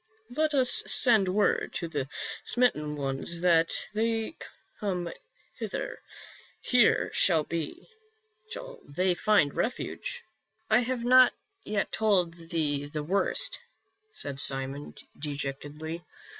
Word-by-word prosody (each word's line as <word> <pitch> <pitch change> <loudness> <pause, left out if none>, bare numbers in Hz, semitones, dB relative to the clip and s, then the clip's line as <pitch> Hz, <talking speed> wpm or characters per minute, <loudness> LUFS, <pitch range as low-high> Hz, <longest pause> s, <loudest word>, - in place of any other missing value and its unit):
Let 310 0 +1
us 255 -2 +5
send 220 -6 +6
word 205 +2 +1
to 170 - -2
the 145 -5 -3 0.4
smitten 150 -12 +2
ones 140 +4 -2
that 165 -2 +4 0.2
they 225 +5 -1 0.4
come 180 -5 -2 0.5
hither; - - -4 0.6
here 245 -3 +3
shall 165 -5 +3 1.4
they 180 +6 +1
find 175 -5 +3
refuge." 255 - -3 0.2
" 220 0 -41
I 220 - +6
have 245 0 -2
not 255 +1 +7 0.3
yet 205 -1 -1
told 195 -6 +2
thee 160 -4 -2
the 150 0 -4
worst," 200 - 0 0.5
said 140 - -7
Simon, 135 +1 -5 0.2
dejectedly. 145 +3 -5
180 Hz, 105 wpm, -28 LUFS, 150-225 Hz, 1.4 s, not